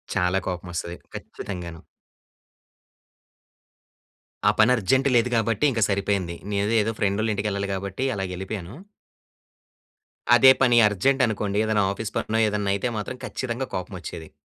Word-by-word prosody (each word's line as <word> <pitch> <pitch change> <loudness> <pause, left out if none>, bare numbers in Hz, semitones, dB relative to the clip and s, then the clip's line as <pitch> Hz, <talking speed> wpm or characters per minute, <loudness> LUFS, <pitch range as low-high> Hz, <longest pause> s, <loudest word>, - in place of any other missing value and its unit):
చాలా 90 +1 +2
కోపం 90 -1 -4
వస్తది. 85 +1 -4 0.2
ఖచ్చితంగాను. 85 -4 -7 2.7
ఆ - - +5
పని 110 +3 +6
అర్జెంట్ 130 +6 +2
లేదు 120 +1 +3
గాబట్టి, 115 +3 +1
ఇంక 115 -2 -2
సరిపోయింది. 100 -3 -1 0.2
నేను 100 +2 0
ఏదో, 110 +2 -1
ఫ్రెండోళ్ళ 105 +2 +1
ఇంటికి 105 +1 -2
వెళ్ళాలి 100 0 -3
గాబట్టి, 100 +6 -3
అలాగ 95 -1 -3
వెళ్ళిపోయాను. 95 +2 -6 1.6
అదే 130 +2 +8
పని 120 -2 +5
అర్జెంటనుకోండి. 105 -2 +1
ఏదైనా 110 -2 +2
ఆఫీస్పనో 110 +1 -2
ఏదైనా 105 -1 -1
అయితే, 100 - -1
మాత్రం 125 +5 -5
ఖచ్చితంగా 130 +1 -4
కోపం 95 +1 -5
వచ్చేది. 85 -2 -8
100 Hz, 125 wpm, -24 LUFS, 95-115 Hz, 2.7 s, అదే